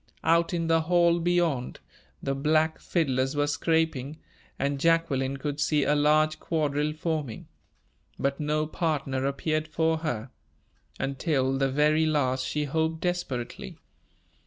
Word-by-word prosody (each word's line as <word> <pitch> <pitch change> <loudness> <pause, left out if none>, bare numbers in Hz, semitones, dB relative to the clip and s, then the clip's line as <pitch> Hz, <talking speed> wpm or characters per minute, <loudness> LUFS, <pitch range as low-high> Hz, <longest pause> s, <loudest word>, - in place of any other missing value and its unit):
Out 170 0 +3
in 170 -2 -1
the 165 0 +3
hall 170 +1 +3
beyond, 170 -7 0 0.4
the 135 - 0
black 155 +3 +1
fiddlers 135 -4 0
were 145 0 +2
scraping, 155 -2 0 0.4
and 140 0 -1
Jacqueline 140 -4 +1
could 145 +1 -4
see 150 -1 +2
a 150 - +2
large 155 +1 +3
quadrille 150 -2 -1
forming. 155 -6 -3 0.7
But 140 0 -1
no 150 0 0
partner 140 -5 -1
appeared 155 +3 -1
for 160 0 0
her. 130 -6 -4 0.7
Until 135 -1 0
the 135 0 +1
very 150 +3 +3
last 130 -4 +1
she 150 - -1
hoped 160 +3 -1
desperately. 135 - -3
150 Hz, 130 wpm, -27 LUFS, 135-160 Hz, 0.7 s, Out